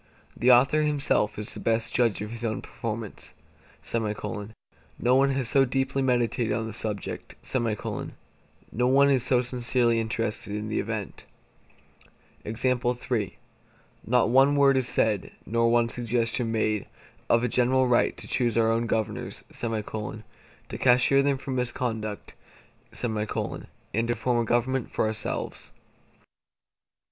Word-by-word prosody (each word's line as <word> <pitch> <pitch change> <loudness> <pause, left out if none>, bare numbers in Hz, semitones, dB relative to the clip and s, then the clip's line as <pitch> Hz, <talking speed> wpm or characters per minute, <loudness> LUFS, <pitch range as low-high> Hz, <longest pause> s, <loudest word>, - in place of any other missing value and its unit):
The 120 - +2
author 135 +5 +5
himself 145 -8 +1
is 105 0 -5
the - - -8
best 115 0 0
judge 115 -4 +2
of 105 - -6
his 120 0 -6
own 110 -1 -2
performance; 110 -2 -6 0.6
no 110 +2 -3
one 135 +1 +4
has 135 -2 -1
so 135 +3 +4
deeply 135 +1 0
meditated 120 -3 +1
on 115 - -1
the 110 - -6
subject; 105 -2 -4 1.4
no 125 +2 +1
one 140 +2 +5
is 130 -3 +2
so 125 -1 +3
sincerely 120 -1 +1
interested 110 -2 -2
in 105 +1 -4
the 110 - -1
event. 110 -1 -4 2.8
Not 120 -1 +2
one 135 +3 +5
word 140 -1 +5
is 130 -1 0
said, 105 -4 0
nor 115 +3 +2
one 120 0 +3
suggestion 115 0 -1
made, 110 -2 0 0.4
of 120 0 +4
a - - +2
general 130 +2 +2
right 120 -1 +2
to - - -7
choose 120 -3 0
our 115 -1 +4
own 115 +1 0
governors; 110 -1 -2
to 110 -1 -6
cashier 125 +2 +5
them 140 -1 +1
for 135 - -7
misconduct; 120 -4 -3 0.7
and 110 0 -3
to 120 - 0
form 120 +1 0
a - - -1
government 120 +2 0
for - - 0
ourselves. 110 0 -3
120 Hz, 130 wpm, -26 LUFS, 110-125 Hz, 2.8 s, author